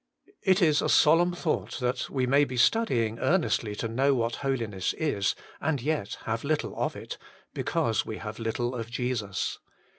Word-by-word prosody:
2. -, -, -25 dB
It 190 Hz, 0 st, +3 dB
Is 155 Hz, -2 st, +4 dB
a -, -, 0 dB
solemn 165 Hz, +3 st, +5 dB
thought 175 Hz, -2 st, -2 dB
that 125 Hz, 0 st, -1 dB
we 130 Hz, -2 st, 0 dB
may 140 Hz, +3 st, +4 dB
be 130 Hz, -3 st, -3 dB
studying 120 Hz, -, +2 dB
earnestly 155 Hz, -, +1 dB
to 115 Hz, -, -3 dB
know 135 Hz, +5 st, +2 dB
what 115 Hz, -1 st, -1 dB
holiness 115 Hz, -9 st, -1 dB
is, 105 Hz, -11 st, 0 dB, 0.2 s
and 145 Hz, -1 st, 0 dB
yet 145 Hz, -5 st, -2 dB
have 115 Hz, +1 st, -2 dB
little 155 Hz, +1 st, -1 dB
of -, -, -1 dB
it, -, -, -7 dB, 0.3 s
because 110 Hz, -2 st, 0 dB
we 110 Hz, -, -6 dB
have 110 Hz, +1 st, -7 dB
little 120 Hz, +2 st, -2 dB
of 115 Hz, -2 st, -5 dB
Jesus. 120 Hz, -6 st, -2 dB
125 Hz, 175 wpm, -28 LUFS, 115-150 Hz, 0.3 s, solemn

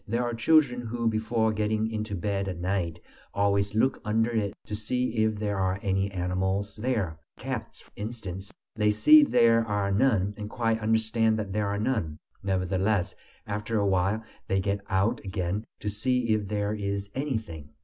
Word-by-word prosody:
There 115 Hz, +3 st, 0 dB
are 120 Hz, 0 st, -2 dB
children 125 Hz, +1 st, +3 dB
who, 115 Hz, 0 st, -2 dB
before 110 Hz, 0 st, +1 dB
getting 110 Hz, +1 st, 0 dB
into 110 Hz, -1 st, -3 dB
bed 100 Hz, +1 st, -1 dB
at 90 Hz, -3 st, -4 dB
night, 85 Hz, -2 st, -2 dB, 0.4 s
always 100 Hz, 0 st, +1 dB
look 130 Hz, +4 st, +2 dB
under 110 Hz, +2 st, +1 dB
it 105 Hz, -3 st, -1 dB
to -, -, -7 dB
see 120 Hz, +3 st, -1 dB
if 110 Hz, 0 st, +2 dB
there 105 Hz, -1 st, -2 dB
are 95 Hz, 0 st, +1 dB
any 95 Hz, 0 st, +1 dB
animals 95 Hz, +2 st, -1 dB
there 105 Hz, -9 st, -1 dB, 0.2 s
cats, -, -, -5 dB
for -, -, -22 dB
instance; 100 Hz, -3 st, -6 dB, 0.2 s
they 105 Hz, -1 st, +2 dB
see 305 Hz, -, +7 dB
there 115 Hz, -, +4 dB
are 105 Hz, -2 st, -1 dB
none, 105 Hz, -3 st, +2 dB
and 105 Hz, 0 st, -6 dB
quite 115 Hz, -1 st, 0 dB
understand 110 Hz, 0 st, +2 dB
there 105 Hz, 0 st, -1 dB
are 100 Hz, 0 st, -1 dB
none. 105 Hz, -9 st, -1 dB, 0.2 s
Nevertheless, 95 Hz, 0 st, 0 dB, 0.3 s
after 105 Hz, +2 st, -2 dB
a 100 Hz, -, +2 dB
while 95 Hz, +3 st, +1 dB, 0.2 s
they 95 Hz, -, +1 dB
get 100 Hz, +1 st, -1 dB
out 105 Hz, +5 st, +1 dB
again 95 Hz, +1 st, -2 dB, 0.2 s
"to -, -, -5 dB
see 125 Hz, +3 st, 0 dB
if 105 Hz, -2 st, -1 dB
there 105 Hz, 0 st, -1 dB
is 100 Hz, -1 st, -3 dB
anything." 110 Hz, -, -4 dB
105 Hz, 170 wpm, -27 LUFS, 95-115 Hz, 0.4 s, see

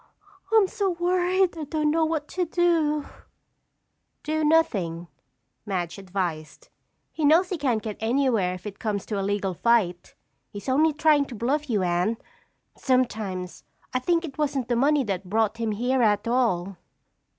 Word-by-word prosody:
I'm 440 Hz, -3 st, +5 dB
so 395 Hz, +1 st, -1 dB
worried 360 Hz, +1 st, +1 dB
I 315 Hz, -2 st, -5 dB
don't 300 Hz, 0 st, 0 dB
know 325 Hz, +1 st, +2 dB
what 315 Hz, -2 st, -2 dB
to 365 Hz, -, -1 dB
do." 330 Hz, -4 st, +1 dB, 1.2 s
"Do 310 Hz, +1 st, -1 dB
nothing," 190 Hz, -, +1 dB, 0.5 s
Madge 185 Hz, -3 st, -3 dB
advised. 175 Hz, -6 st, -5 dB, 0.4 s
"He 315 Hz, -, -5 dB
knows 330 Hz, +5 st, +5 dB
he 365 Hz, -, -2 dB
can't 245 Hz, -7 st, 0 dB
get 215 Hz, -2 st, -5 dB
anywhere 225 Hz, -6 st, +1 dB
if 185 Hz, -, -12 dB
it 205 Hz, -1 st, -7 dB
comes 210 Hz, -3 st, -2 dB
to 210 Hz, -3 st, -3 dB
a -, -, -1 dB
legal 195 Hz, -1 st, -1 dB
fight. 185 Hz, -4 st, +1 dB, 0.3 s
He's 205 Hz, +4 st, -9 dB
only 300 Hz, +5 st, +3 dB
trying 300 Hz, -1 st, +3 dB
to 255 Hz, -, -9 dB
bluff 280 Hz, +6 st, -1 dB
you, 210 Hz, -5 st, +1 dB
Anne. 180 Hz, +5 st, 0 dB, 0.6 s
Sometimes, 215 Hz, -8 st, -1 dB, 0.3 s
I 255 Hz, -, +1 dB
think 335 Hz, +5 st, +1 dB
it 300 Hz, -1 st, -10 dB
wasn't 275 Hz, -5 st, -1 dB
the 240 Hz, -, +2 dB
money 280 Hz, +3 st, +3 dB
that 195 Hz, -4 st, -4 dB
brought 220 Hz, +1 st, +1 dB
him 225 Hz, -2 st, -1 dB
here 245 Hz, +5 st, 0 dB
at 210 Hz, -1 st, +2 dB
all." 195 Hz, -7 st, 0 dB
245 Hz, 160 wpm, -25 LUFS, 200-305 Hz, 1.2 s, I'm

